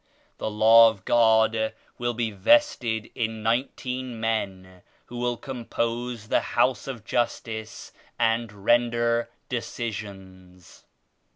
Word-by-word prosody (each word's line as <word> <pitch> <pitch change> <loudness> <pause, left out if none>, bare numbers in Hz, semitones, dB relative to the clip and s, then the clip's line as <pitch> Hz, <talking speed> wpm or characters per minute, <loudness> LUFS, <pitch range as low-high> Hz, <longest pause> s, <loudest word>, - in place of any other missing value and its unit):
The - - -2
Law 115 +2 +7
of 100 -4 -10
God 110 -1 +3 0.2
will 120 -1 -1
be 115 -1 -1
vested 110 - +2
in 110 -2 -3
nineteen 125 +1 -2
men 95 -5 -3 0.2
who 120 - -8
will 120 0 -1
compose 120 -2 -4
the - - +3
liouse 125 0 0
of 120 -5 -7
Justice 110 -2 -3 0.2
and 115 -1 +1
render 120 0 +2 0.2
decisions. 95 -7 -7
115 Hz, 105 wpm, -25 LUFS, 110-120 Hz, 0.2 s, Law